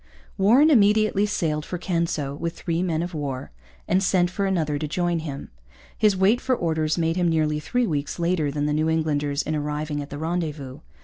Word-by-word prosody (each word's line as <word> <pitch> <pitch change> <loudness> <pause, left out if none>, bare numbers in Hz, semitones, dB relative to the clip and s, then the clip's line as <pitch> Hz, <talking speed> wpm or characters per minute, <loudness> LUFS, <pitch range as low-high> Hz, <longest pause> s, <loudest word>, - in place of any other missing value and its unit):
Warren 245 +11 +5
immediately 210 -3 +4
sailed 155 -7 -1
for 180 - -5
Canso 170 -6 -1
with 165 +3 -4
three 170 -1 -2
men 170 -3 0
of 175 +1 -5
war 140 -4 -4 0.4
and 185 +2 +2
sent 180 -2 +2
for 195 +1 -1
another 155 -6 0
to 155 - -3
join 175 +2 0
him. 145 -3 -7 0.4
His 210 -3 +2
wait 205 +6 +3
for 260 -1 +1
orders 160 -5 0
made 165 0 0
him 175 -1 +2
nearly 155 -2 +1
three 245 - 0
weeks 150 -7 -2
later 170 -3 0
than 145 +1 -2
the 150 - 0
New 155 +1 +1
Englanders 150 -2 0
in 155 - -2
arriving 150 0 -3
at 140 - -8
the 145 - -6
rendezvous. 155 -4 -3
165 Hz, 195 wpm, -24 LUFS, 150-185 Hz, 0.4 s, Warren